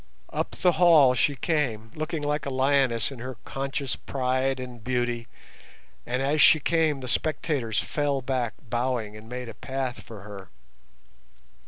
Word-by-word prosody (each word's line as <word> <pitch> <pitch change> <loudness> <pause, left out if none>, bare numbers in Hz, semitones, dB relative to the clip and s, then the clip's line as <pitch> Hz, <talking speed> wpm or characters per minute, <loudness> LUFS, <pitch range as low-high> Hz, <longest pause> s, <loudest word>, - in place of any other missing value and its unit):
Up - - -2
the 180 - +3
hall 160 -6 +6
she 140 +3 +2
came, 120 -6 -1
looking 155 0 -3
like 145 -1 -1
a - - 0
lioness 130 -3 +2
in 135 - -9
her 130 +1 -6
conscious 135 0 -2
pride 130 0 -1
and 125 -3 -8
beauty, 120 -1 -1 0.8
and 125 +2 -1
as 145 +3 +2
she 155 - +8
came 155 -3 +1
the 130 - -6
spectators 140 -6 -1
fell 145 0 0
back 125 -3 -1
bowing 120 -2 -1
and 110 +1 -11
made 125 0 -5
a 115 - -7
path 130 +2 -4
for 110 -3 -11
her. 100 -2 -10
130 Hz, 155 wpm, -26 LUFS, 120-145 Hz, 0.8 s, she